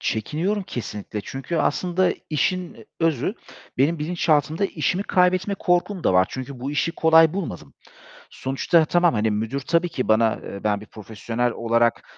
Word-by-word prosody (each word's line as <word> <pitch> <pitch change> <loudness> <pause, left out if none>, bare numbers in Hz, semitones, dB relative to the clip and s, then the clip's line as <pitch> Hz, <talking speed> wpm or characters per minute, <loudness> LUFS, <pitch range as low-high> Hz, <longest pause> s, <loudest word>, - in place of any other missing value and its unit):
Çekiniyorum 160 - -1
kesinlikle. 105 - -6
Çünkü 135 - -5
aslında 180 +4 +1 0.2
işin 180 +3 -2
özü 165 - +1 0.4
benim 155 +5 +2
bilinçaltımda 155 +1 +1
işimi 175 +2 -1
kaybetme 185 0 +2
korkum 180 0 0
da - - +3
var. 90 0 +4
Çünkü 130 0 -7
bu 135 +3 -3
işi 150 +3 0
kolay 160 -1 +5
bulmadım. 90 - -5 0.6
Sonuçta 145 +5 +1
tamam, 175 0 +3
hani, 110 -1 +1
müdür 110 +6 -2
tabii 170 +4 +1
ki 140 -6 -3
bana, 110 0 +3
eee, 100 - -8
ben 105 -1 0
bir - - -10
profesyonel 115 +3 -3
olarak 115 0 +1
150 Hz, 150 wpm, -23 LUFS, 115-175 Hz, 0.6 s, kolay